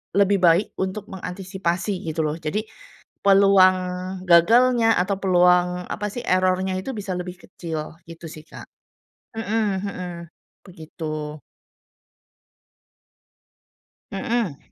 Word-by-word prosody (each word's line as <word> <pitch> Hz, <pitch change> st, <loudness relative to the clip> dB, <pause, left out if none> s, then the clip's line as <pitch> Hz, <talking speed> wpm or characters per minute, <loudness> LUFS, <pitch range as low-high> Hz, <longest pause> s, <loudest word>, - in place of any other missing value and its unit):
lebih 200 Hz, 0 st, +4 dB
baik 175 Hz, +3 st, +3 dB
untuk 190 Hz, +2 st, -3 dB
mengantisipasi, 185 Hz, 0 st, -3 dB
gitu 160 Hz, 0 st, -1 dB
loh. 150 Hz, +1 st, -1 dB
Jadi, 205 Hz, +8 st, -3 dB, 0.6 s
peluang 195 Hz, -1 st, +6 dB, 0.5 s
gagalnya 225 Hz, +7 st, +5 dB
atau 190 Hz, +2 st, 0 dB
peluang, 180 Hz, -1 st, +3 dB
apa 210 Hz, +2 st, -3 dB
sih, 245 Hz, -, -5 dB
error-nya 185 Hz, +1 st, +1 dB
itu 265 Hz, -, -6 dB
bisa 195 Hz, -2 st, -4 dB
lebih 180 Hz, 0 st, -6 dB
kecil, 160 Hz, -2 st, -7 dB
gitu 165 Hz, 0 st, -10 dB
sih 155 Hz, -, -10 dB
Kak. -, -, -11 dB, 0.7 s
Heeh 225 Hz, -1 st, 0 dB, 0.2 s
heeh. 180 Hz, -3 st, -5 dB, 0.5 s
Begitu. 155 Hz, -3 st, -7 dB, 2.7 s
Heeh. 200 Hz, -, -2 dB
185 Hz, 100 wpm, -23 LUFS, 170-200 Hz, 2.7 s, peluang